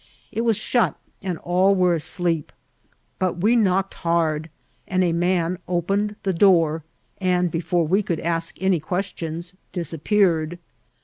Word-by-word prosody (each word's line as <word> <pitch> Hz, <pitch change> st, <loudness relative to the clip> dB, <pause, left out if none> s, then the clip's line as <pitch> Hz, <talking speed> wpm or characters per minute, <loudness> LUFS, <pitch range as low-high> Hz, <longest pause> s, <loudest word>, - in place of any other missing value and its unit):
' -, -, -33 dB
It 225 Hz, -, -2 dB
was 230 Hz, -2 st, +2 dB
shut, 235 Hz, +2 st, +1 dB, 0.3 s
and 185 Hz, -3 st, -3 dB
all 185 Hz, +4 st, +2 dB
were 180 Hz, -2 st, +3 dB
asleep; 165 Hz, 0 st, -1 dB, 0.7 s
butweknocked 195 Hz, +1 st, +2 dB
hard, 165 Hz, -2 st, 0 dB, 0.4 s
and 185 Hz, 0 st, +1 dB
a 170 Hz, -2 st, +1 dB
man 175 Hz, 0 st, +1 dB
opened 195 Hz, +4 st, 0 dB
the 190 Hz, -, 0 dB
dooTj 165 Hz, -4 st, +4 dB, 0.4 s
and, 180 Hz, -2 st, +1 dB
before 170 Hz, 0 st, 0 dB
we 190 Hz, +6 st, +2 dB
could 170 Hz, -5 st, -2 dB
ask 165 Hz, 0 st, -2 dB
any 190 Hz, -2 st, +2 dB
questions, 170 Hz, 0 st, -4 dB, 0.2 s
disappeared. 170 Hz, 0 st, +1 dB
180 Hz, 130 wpm, -23 LUFS, 165-190 Hz, 0.7 s, dooTj